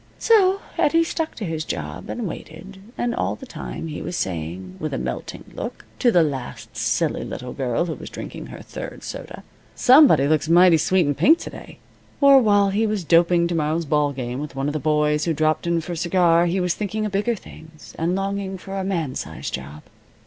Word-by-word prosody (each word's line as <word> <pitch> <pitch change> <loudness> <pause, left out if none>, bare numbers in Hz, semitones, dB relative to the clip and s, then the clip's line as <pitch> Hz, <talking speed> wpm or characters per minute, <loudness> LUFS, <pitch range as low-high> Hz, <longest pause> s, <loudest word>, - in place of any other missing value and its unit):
So 395 -3 +4 0.2
Eddie 330 +3 +4
stuck 325 -1 -3
to 215 - -5
his 160 -2 -3
job, 75 - -6
and 235 -4 -3
waited, 180 +4 -9 0.2
and 240 0 -1
all - - -1
the 265 - -11
time 250 - -7
he 155 -2 -6
was 175 +2 -4
saying, 90 +2 -4
with 150 -3 -3
a - - -2
melting - - -5
look, - - -6
to 245 - +4
the 175 -5 +5
last 125 -6 -5
silly 115 +8 0
little 125 0 -6
girl 130 +3 -1
who 165 - -3
was - - -9
drinking - - -8
her - - -10
third - - -8
soda, - - -8 0.3
"Somebody 250 - +6
looks 155 +1 +1
mighty 175 0 +6
sweet 180 +2 +2
in 145 - +1
pink 315 - +5
to - - -8
day," - - -11 0.4
or 280 -1 +7
while 205 -3 +3
he 220 +3 +1
was 210 -3 -2
doping 170 +1 +4
to - - -1
morrow's 160 +1 0
ball 150 -1 +1
game 125 -1 -4
with 150 -1 -6
one 135 0 -2
of 145 - -1
the 155 - -1
boys 150 0 +1
who 165 -2 0
dropped 155 +2 +1
in 170 -1 +1
for 170 - -7
a - - -3
cigar, 170 0 +3
he 180 +3 0
was 180 -1 +1
thinking 215 +1 -3
of 210 - -3
bigger 210 +5 0
things, 160 -5 -14
and 170 +3 0
longing 195 0 -3
for 195 +1 -6
a - - -2
man 170 -8 -2
size - - -5
job. 70 +3 -7
170 Hz, 215 wpm, -22 LUFS, 150-195 Hz, 0.4 s, or